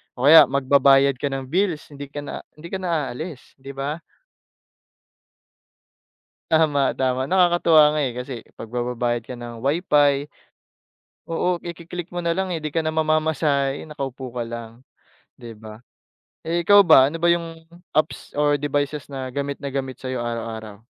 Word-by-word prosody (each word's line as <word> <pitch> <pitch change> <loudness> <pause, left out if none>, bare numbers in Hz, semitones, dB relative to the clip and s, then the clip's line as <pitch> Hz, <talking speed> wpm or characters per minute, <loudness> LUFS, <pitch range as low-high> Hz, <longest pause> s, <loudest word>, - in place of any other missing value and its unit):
o 125 - -6
kaya 160 -1 +9
magbabayad 140 0 +4
ka 145 - -1
ng 135 -1 -4
bills 180 -3 0
hindi 145 -1 -8
ka 145 +1 -7
na 145 - -6 0.2
hindi 165 +3 -11
ka 190 - -3
na 165 -7 -1
aalis, 155 +1 -8
di 135 +1 -9
ba? 145 +4 -3 2.5
Tama, 150 -4 +3
tama, 130 +1 0
nakakatuwa 170 -4 +5
nga 155 - 0
eh, 130 - 0
kasi 125 +2 -6 0.2
'pag - - -7
magbabayad 120 0 -2
ka 125 +1 -9
ng 120 -1 -9
WiFi 145 -1 +2 1.0
Oo, 175 +2 -1
iki-click 170 0 -7
mo 175 - -3
nalang 180 +2 -1
eh, 160 - -4
di 155 - -3
ka 160 +1 -1
na 155 - -1
mamamasahe, 155 -3 +1
nakaupo 135 -4 -6
ka 120 -1 -4
lang, 115 +2 -9 0.5
di 120 -1 -11
ba? 110 0 -12 0.7
Eh, 170 +1 0
ikaw 205 +3 +7
ba, 150 -7 +6
ano 165 - -6
ba 170 - +3
yung 165 -1 0 0.3
apps 155 +1 -1
or 145 0 +2
devices 145 0 -2
na 130 -1 -5
gamit 140 +2 -4
na 140 - -4
gamit 135 -2 -5
sa'yo 130 -2 -4
araw-araw? 110 -3 -6
140 Hz, 155 wpm, -22 LUFS, 130-160 Hz, 2.5 s, kaya